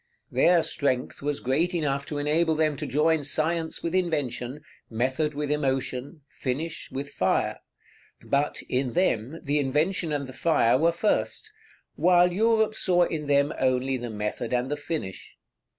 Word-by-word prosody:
Their 175 -2 +4
strength 130 -3 -1
was 145 0 -1
great 160 +8 0
enough 140 -4 -1
to 150 - -4
enable 155 +3 +1
them 155 -1 +1
to 150 0 -4
join 155 +2 +2
science 160 +3 -1
with 170 - -2
invention, 145 -7 -1 0.3
method 130 +6 -1
with 145 0 -2
emotion, 135 0 -2
finish 150 +5 -4
with 140 +1 -5
fire; - - 0 0.6
but, 140 +1 0
in 125 -1 -1
them, 160 - 0
the 145 +1 +1
invention 155 +6 0
and 145 -1 -1
the 130 - -10
fire 135 -5 +3
were 165 +1 +4
first, 215 - -1 0.4
while 180 0 +4
Europe 220 +2 +3
saw 180 -4 +3
in 155 -3 -3
them 140 +1 +3
only 130 0 +1
the 120 -1 -4
method 105 +3 -3
and 125 +3 -1
the - - +1
finish. 145 - -6
150 Hz, 150 wpm, -26 LUFS, 130-165 Hz, 0.6 s, Their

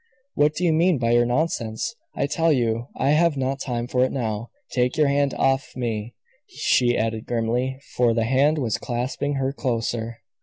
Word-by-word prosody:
"What 150 +1 +2
do 180 - -3
you 170 -2 +3
mean 170 +1 +3
by 115 -2 0
your 120 0 +4
nonsense? 120 - -1 0.2
I - - 0
tell 165 +3 +1
you 120 -3 0
I 135 - +2
have 155 -1 +3
not 135 +1 -1
time 120 -3 -3
for 125 +1 +1
it 130 - +1
now. 115 -3 -3 0.2
Take 125 +2 0
your 155 - +4
hand 140 0 +1
off 135 +1 +1
me," 115 -2 -3 0.3
she 120 -1 +2
added 110 0 -2
grimly 120 +3 -1 0.2
for 120 -2 +3
the 115 -1 +1
hand 140 +6 +3
was 120 -7 -1
clasping 130 +4 -2
her 135 0 -1
closer. 115 -3 -2
125 Hz, 185 wpm, -23 LUFS, 115-140 Hz, 0.3 s, your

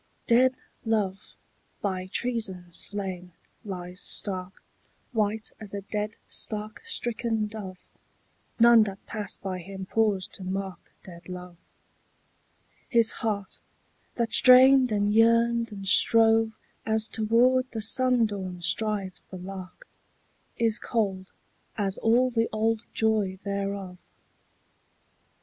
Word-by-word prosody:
DEAD 255 +2 +4 0.3
love, 205 -4 -2 0.4
by 185 -2 -3
treason 190 -6 -3
slain, 185 -3 -2 0.3
lies 180 -3 -6
stark, 185 -2 0 0.5
White 215 -1 -1
as 205 -2 -8
a 200 - -4
dead 210 +1 -4
stark 215 0 -5
stricken 235 - -1
dove: 210 -3 -8 0.8
None 235 0 +7
that 195 -1 -8
pass 215 -2 -5
by 185 -2 -5
him 190 +1 -8
pause 205 -2 +1
to 190 - -6
mark 190 0 -4 0.2
Dead 170 -1 -13
love. 180 -1 -8 1.3
His 230 -2 +3
heart, 205 -4 -4 0.5
that 230 -2 -2
strained 255 0 +7
and 205 0 +1
yearned 230 +1 +3
and 195 -2 -7
strove 225 +2 +4 0.3
As 220 0 +1
toward 245 +4 +2
the 225 - -5
sundawn 220 -6 +1
strives 195 0 -1
the 185 - -10
lark, 190 - -9 0.7
Is 230 -1 +1
cold 195 -5 -2 0.5
as 200 -2 +1
all 245 +3 +3
the 225 -1 0
old 220 +1 0
joy 215 -4 0
thereof. 200 -2 -4
210 Hz, 110 wpm, -27 LUFS, 190-230 Hz, 1.3 s, None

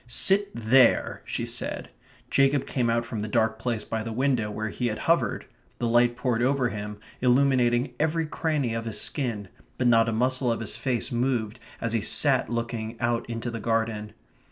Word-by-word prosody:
"Sit 195 +11 +3
THERE," 120 +3 +3
she - - -3
said. - - -3 0.4
Jacob 135 0 +3
came 120 -3 0
out 115 0 +1
from 115 - -5
the 105 - -3
dark 110 0 +1
place 115 -2 -2
by 110 -1 -3
the 115 +1 -5
window 125 -2 0
where 110 +1 -3
he 125 +4 -2
had 110 - -2
hovered. 165 +1 +1 0.3
The - - -2
light 120 +1 +3
poured 125 -3 0
over 130 -1 +2
him, 105 -1 -6 0.2
illuminating 125 -1 +3
every 160 +1 +1
cranny 150 -6 -1
of 115 0 -3
his 110 -2 -3
skin; 115 -9 -2 0.3
but 125 - -1
not 115 -1 +4
a - - 0
muscle 125 +2 +1
of 115 - -1
his 110 - -5
face 130 +1 -2
moved 120 -2 -1 0.2
as 115 -1 -2
he 115 - +1
sat 130 +5 +2
looking 115 -1 -4
out 120 -1 -1
into 115 +1 -4
the 115 - -5
garden. 110 -1 -1
120 Hz, 185 wpm, -26 LUFS, 115-130 Hz, 0.4 s, not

